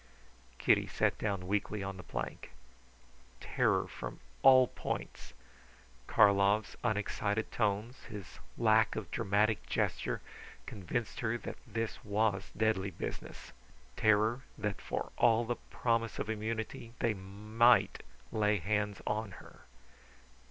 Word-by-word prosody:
Kitty - - +3
sat - - 0
down 100 -3 -2
weakly 105 +1 -1
on 95 -1 -5
the - - -7
plank. 80 - -6 0.9
Terror - - +1
from - - -7 0.2
all 130 -1 +8
points. - - -5 0.7
Karlov's 100 +1 +4
unexcited 105 -1 -1
tones 110 +3 -1
his 105 -6 -9 0.2
lack 110 -1 +4
of 100 -6 -5
dramatic 105 0 +1
gesture - - -1 0.5
convinced 105 +4 -4
her 120 0 0
that - - -7
this 115 0 -3
was 105 -2 0
deadly 110 -3 +1
business. 85 - -7 0.4
Terror 110 +3 +3 0.2
that 105 -1 -3
for - - -4
all 115 0 +4
the 120 +1 -2
promise 115 -2 0
of 110 - -2
immunity 110 +1 -4
they 115 -2 +1
might 105 +5 +2 0.3
lay 105 -1 +2
hands 105 +3 -1
on 105 -2 -2
her. - - -14
105 Hz, 115 wpm, -33 LUFS, 100-115 Hz, 0.9 s, all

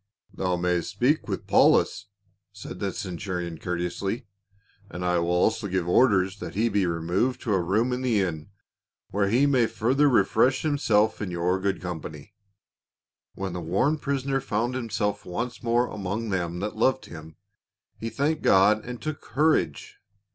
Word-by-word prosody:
" - - -37
Thou 90 -1 -1
mayst 90 -1 0
speak 145 +6 +1
with - - -4
Paulus," - - +3 0.4
said 100 +1 -9
the 100 - -1
centu 95 -1 -4
rion 85 -2 -5
courteously, 90 +6 -3 0.3
'" 100 0 -32
and 90 0 -5
I 90 -1 +2
will 85 0 -1
also 105 +5 +1
give 90 -2 -1
orders 95 -1 +3
that - - -7
he 115 +3 +2
be 100 -3 +1
removed 85 +9 0
to 110 - -1
a 95 - +2
room 110 +8 +1
in 125 - -2
the 120 -5 +1
inn, 80 -3 -2 0.6
where 100 0 +1
he 125 +6 +3
may 130 -5 +3
fur 115 +4 0
ther 145 +1 +4
refresh 125 +3 +3
himself 110 -9 +2
in 105 - -3
your 90 +2 0
good 95 0 -1
company." 80 0 -7 1.0
When 95 -2 -4
the 90 - -4
worn 100 - +1
prisoner 135 -1 -1
found 120 +1 -1
himself 110 -4 -2
once 120 +7 -4
more 120 +1 +2
among 105 +3 -4
them 90 -2 -2
that 105 +1 -3
loved 130 +4 +1
him, 80 -1 -11 0.6
"he 115 - -3
thanked 145 +6 -1
God 105 +3 +4
and 125 0 -7
took 155 -1 -5
courage." 135 - 0
100 Hz, 170 wpm, -26 LUFS, 90-120 Hz, 1.0 s, ther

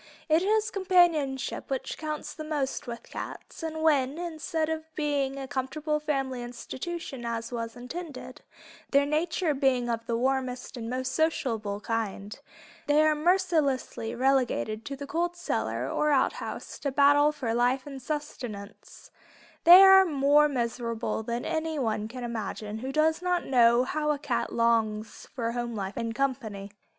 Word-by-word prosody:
It 315 +2 +4
is 435 +3 +1
companionship 350 -9 +2
which 270 -2 -3
counts 305 -1 -5
the 310 - -7
most 295 -5 -2
with 235 -1 -6
cats, - - -8
and 315 -1 -4
when, 285 -2 +2
instead 320 -2 -2
of 320 0 -3
being 285 -3 -1
a 270 -1 -5
comfortable 300 +3 -2
family 270 -4 -2
institution 255 +3 -6
as 230 0 -3
was 230 -1 -4
intended, 255 0 -8 0.5
their 280 0 +4
nature 320 +2 0
being 265 -3 +1
of 230 0 -4
the 230 - 0
warmest 255 0 -1
and 230 -2 -5
most 255 +1 -2
sociable 225 -10 0
kind, 215 -3 -3 0.5
they 295 +1 +4
are 310 0 +4
mercilessly 305 -8 +1
relegated 245 -4 +1
to 280 - -4
the 280 +1 -7
cold 340 +4 -1
cellar 350 - -2
or 300 - 0
outhouse 275 -3 -1
to 280 - -2
battle 290 +2 +5
for 250 -6 -3
life 245 +2 +1
and 275 -2 -8
sustenance, 245 -8 -7 0.5
they 355 +3 +11
are 385 0 +9
more 295 -2 +4
miserable 235 -3 -2
than 235 +2 -3
anyone 295 -10 -1
can 250 +2 -8
imagine 220 -2 -4
who 260 +3 -4
does 315 +3 +2
not 360 -1 0
know 240 -1 +5
how 300 +3 -1
a 300 - +2
cat 275 -4 -2
longs 225 -2 0
for 230 -3 -1
home 240 -1 -3
life 195 -1 -4
and 230 -1 -3
company. 225 -7 -2
270 Hz, 150 wpm, -28 LUFS, 235-310 Hz, 0.5 s, they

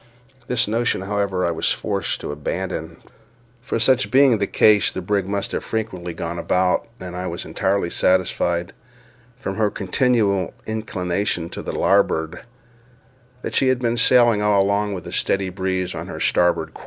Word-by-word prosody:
This 125 -1 +1
notion, 115 -2 0
however, 100 -2 -1
I 85 - +1
was 80 - 0
forced - - -2
to - - -4
abandon; 80 +2 -4 0.6
for 125 - -2
such 125 +3 +2
being 130 -4 +5
the 100 - 0
case, 105 -2 +4
the - - -5
brig 95 +1 -1
must 100 0 -2
have - - -3
frequently 95 -6 -4
gone 85 +1 -5
about; 90 +4 +1
and 90 -1 -7
I 90 +1 -4
was 85 0 -5
entirely 100 -4 -1
satisfied, 90 -2 +1 0.6
from 95 -7 -5
her 110 -2 +2
continual 100 -1 0
inclination 95 -5 -2
to - - -6
the - - -5
larboard, 80 +2 +1 1.0
that - - -4
she 135 - +2
had 130 0 +3
been 120 -1 0
sailing 120 -2 +4
all 105 -2 +3
along 100 +1 0
with 90 - -6
a - - -7
steady 95 -1 0
breeze 95 0 -2
on - - -6
her - - -7
starboard 85 -2 +1
quarter. - - -12
95 Hz, 165 wpm, -21 LUFS, 90-110 Hz, 1.0 s, being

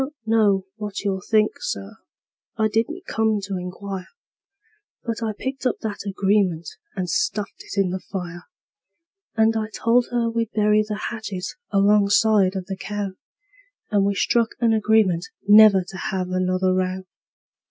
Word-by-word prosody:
I - - +1
don't 295 +3 -12
know 210 -4 +3
what 210 -2 -5
you'll 195 -2 -1
think, 215 +2 +2
Sir 100 0 -5 0.6
I 220 -1 +2
didn't 310 - -1
come 220 -1 +1
to 195 0 -4
inquire 185 +1 -6 1.0
But 230 -1 -3
I 225 -1 -1
picked 265 +5 -3
up - - 0
that 210 -2 -5
agreement 195 -4 +1 0.3
and 185 -2 -2
stuffed 210 - -2
it 200 - -4
in 190 -2 +2
the 185 - -3
fire; 175 -3 -7 0.9
And 225 0 +3
I 220 -1 -1
told 235 +3 +2
her 240 -1 0
we'd 230 -1 -2
bury 210 0 +3
the 210 0 -4
hatchet 205 -5 -5 0.2
alongside 200 -1 +4
of 190 -1 -3
the 195 +1 -5
cow; 205 -1 -4 0.8
And 205 -2 +3
we 200 0 +1
struck 230 +3 +1
an 230 -2 +3
agreement 215 -5 +2 0.2
never 205 -2 +8
to 185 +1 -10
have 185 -1 -3
another 185 0 +1
row. 185 0 -1
205 Hz, 155 wpm, -23 LUFS, 190-220 Hz, 1.0 s, never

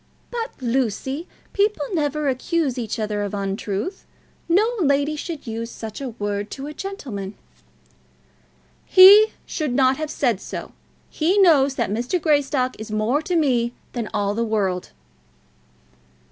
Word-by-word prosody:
"But, 470 -1 -5
Lucy, 265 - -1 0.3
people 405 -7 +1
never 300 -2 0
accuse 275 +1 0
each 230 0 -3
other 210 -2 -2
of 205 0 -3
untruth. 200 - -3 0.5
No 390 +6 +4
lady 285 -1 +2
should 315 -1 -6
use 230 0 -4
such 220 +1 -8
a 270 - -3
word 205 -2 -3
to 270 - -6
a 300 - -6
gentleman." 255 - -6 1.5
"He 400 +3 +9 0.2
should 300 -6 -2
not 260 0 +3
have 310 -1 -3
said 240 -9 0
so. - - -7 0.4
He 340 +6 +1
knows 290 -8 +5
that 235 -6 -1
Mr. 245 - -1
Greystock 285 -5 +1
is 220 +1 -7
more 215 +7 0
to 350 +3 -2
me 245 -7 +2 0.2
than 235 -3 -3
all 205 -1 0
the 230 +2 -1
world." 200 -5 -1
265 Hz, 140 wpm, -22 LUFS, 220-310 Hz, 1.5 s, He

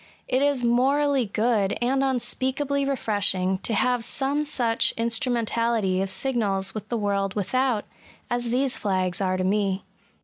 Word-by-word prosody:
It 255 +1 +1
is 285 -3 +1
morally 265 +2 +2
good, 210 -1 +1
and 265 +3 +1
unspeakably 270 +2 -1
refreshing, 200 -7 +1
to 225 - -1
have 250 +1 +1
some 280 +4 0
such 245 -6 +1
instrumentality 230 -4 0
of 195 - -2
signals 195 -3 0
with 215 - -7
the 235 - -1
world 200 -2 -1
without, 240 +2 0 0.4
as 240 -1 -2
these 255 +2 +1
flags 185 -2 -1
are 185 -1 0
to 185 - -1
me. 195 0 0
235 Hz, 140 wpm, -25 LUFS, 200-260 Hz, 0.4 s, morally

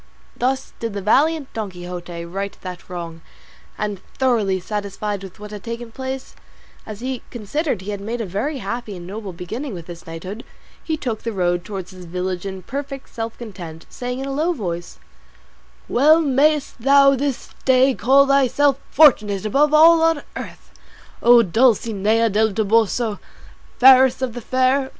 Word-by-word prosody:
Thus 260 +2 -1
did 230 -2 -4
the 200 - -4
valiant 290 +7 +2
Don 215 -3 -3
Quixote 175 -1 -7
right 195 +3 -5
that 180 -1 -8
wrong, 170 -2 -7 0.6
and, 205 -3 -3 0.2
thoroughly 220 -8 +1
satisfied 205 +1 -4
with 190 -1 -11
what 210 0 -9
had 210 -2 -8
taken 230 0 -6
place, 260 +2 -6 0.5
as 215 0 -8
he 255 0 -3
considered 240 - -2
he 200 +2 -5
had 200 -1 -5
made 230 +4 -4
a 225 - -2
very 210 - -3
happy 235 -5 -5
and 175 - -9
noble 200 +1 -6
beginning 215 - -6
with 170 -2 -8
his 170 -1 -11
knighthood, 185 +7 -7 0.4
he 320 -1 -2
took 235 -7 -4
the 230 - -3
road 175 -3 0
towards 190 -2 -7
his 185 -1 -11
village 180 +2 -3
in 190 -1 -7
perfect 275 +3 -6
self 225 0 -5
content, 175 -8 -9
saying 250 0 -4
in 270 - -4
a 275 - -4
low 320 +5 +1
voice, 175 - -5 0.9
"Well 305 +6 +5
mayest 290 -2 +1
thou 275 +2 +6
this 275 -1 -3
day 260 +1 +4
call 270 +5 +4
thyself 275 0 +3
fortunate 215 -10 +4
above 280 +7 +3
all 325 +2 +7
on 325 -2 +2
earth, - - -9 0.5
O 240 0 +7
Dulcinea 225 0 +2
del 215 +1 +2
Toboso, 220 +1 +1 0.6
fairest 260 0 +6
of 250 -3 -2
the 245 - -6
fair! 260 +3 +1
225 Hz, 165 wpm, -21 LUFS, 195-265 Hz, 0.9 s, all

